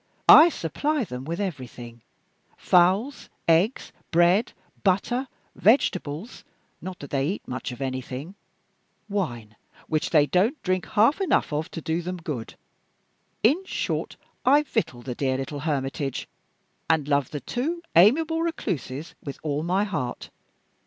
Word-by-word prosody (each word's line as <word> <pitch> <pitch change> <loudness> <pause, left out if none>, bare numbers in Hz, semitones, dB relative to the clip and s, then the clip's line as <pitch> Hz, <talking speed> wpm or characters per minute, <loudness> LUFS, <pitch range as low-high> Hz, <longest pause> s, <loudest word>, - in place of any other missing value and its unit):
I 325 +2 +10
supply 295 - -1
them 125 - -7
with 170 +4 -4
everything 125 - -6 0.6
fowls, 190 +10 +2 0.2
eggs, 170 +9 +2 0.2
bread, 175 +6 +3 0.3
butter, 230 +7 +1 0.3
vegetables 185 - +1 0.4
(not 185 -1 -6
that 140 - -9
they 135 0 +1
eat 195 - -4
much 130 +1 -4
of 125 - -9
anything), 130 +5 -5 0.7
wine 120 - -3 0.3
(which 155 -1 0
they 150 -3 +5
don't 205 - +1
drink 185 -1 0
half 230 - +3
enough 370 - +1
of 155 +4 -2
to 165 - -7
do 160 +2 -1
them 180 +2 -4
good); 150 -9 -6 0.9
in 290 - +4
short, - - -3 0.3
I 285 +4 +5
victual 215 - -2
the 125 - -4
dear 130 +1 -1
little 135 +2 -5
hermitage, 135 -2 -2 0.6
and 160 -3 +2
love 140 -3 +1
the 145 - -5
two 320 - -3
amiable 315 - +5
recluses 170 - -3
with 140 - -6
all 150 -1 -1
my 180 +5 +1
heart. 130 -12 -4
170 Hz, 135 wpm, -25 LUFS, 140-215 Hz, 0.9 s, I